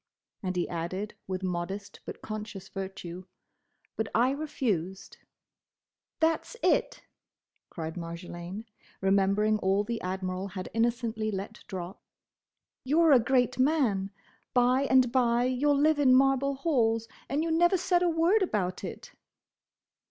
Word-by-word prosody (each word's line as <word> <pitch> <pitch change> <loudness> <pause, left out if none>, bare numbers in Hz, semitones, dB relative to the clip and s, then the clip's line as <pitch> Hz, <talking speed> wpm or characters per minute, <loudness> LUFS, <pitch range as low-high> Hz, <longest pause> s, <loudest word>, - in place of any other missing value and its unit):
and 185 -3 -3
he 175 - 0
added 180 +5 -4
with 190 0 -3
modest 185 +3 -4
but - - -8
conscious 215 -3 -6
virtue, 190 -2 -6 0.7
"but 220 - -1
I 245 +3 +4
refused." 215 - -3 1.0
"That's 325 +8 0
it!" - - +1 0.7
cried 160 0 -6
Marjolaine, 175 +4 -7 0.3
remembering 200 +2 +2
all 195 +1 +2
the 230 +2 -4
Admiral 185 +1 -3
had 185 -1 -6
innocently 230 -1 0
let 205 +2 -5
drop. 185 -1 -6 0.8
"You 290 +5 +2
're 330 -2 +6
a 265 - +8
great 250 +1 +1
man; 255 -9 +2 0.5
by 250 +2 +4
and 255 -2 +5
by 240 -2 +3
you 255 +3 +1
'll 285 - +4
live 300 +1 +3
in 260 -3 +6
marble 270 +1 +3
halls; 230 -6 +1 0.2
and 290 +3 0
you 330 - -1
never 345 +3 +4
said 355 0 +2
a 355 - +3
word 335 +6 +3
about 200 - -1
it!" - - -7
225 Hz, 135 wpm, -29 LUFS, 190-270 Hz, 1.0 s, a